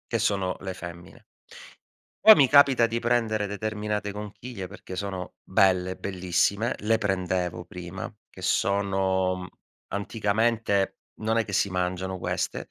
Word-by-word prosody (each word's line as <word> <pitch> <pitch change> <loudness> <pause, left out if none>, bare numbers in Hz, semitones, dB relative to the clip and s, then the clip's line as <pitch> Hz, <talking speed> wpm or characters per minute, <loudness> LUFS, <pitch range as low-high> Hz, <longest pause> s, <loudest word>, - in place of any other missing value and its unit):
Che 115 - +1
sono 100 -4 0
le 95 -1 -5
femmine. 85 -2 -10 1.0
Poi 220 0 +11
mi 140 -3 +5
capita 140 -3 +6
di 115 0 -1
prendere 115 -3 +1
determinate 105 0 -3
conchiglie 105 0 -7
perché 95 -1 -9
sono 95 -1 -4
belle, 95 -1 +2
bellissime. 95 +4 0
Le 110 +2 +2
prendevo 90 -3 -1
prima, 90 +1 -7 0.2
che - - -12
sono 95 -2 +1 0.4
anticamente, 105 0 0 0.2
non 110 +1 +1
è 115 - 0
che 105 - -7
si 100 +1 +2
mangiano 90 +1 -2
queste. - - -3
100 Hz, 125 wpm, -26 LUFS, 95-110 Hz, 1.0 s, Poi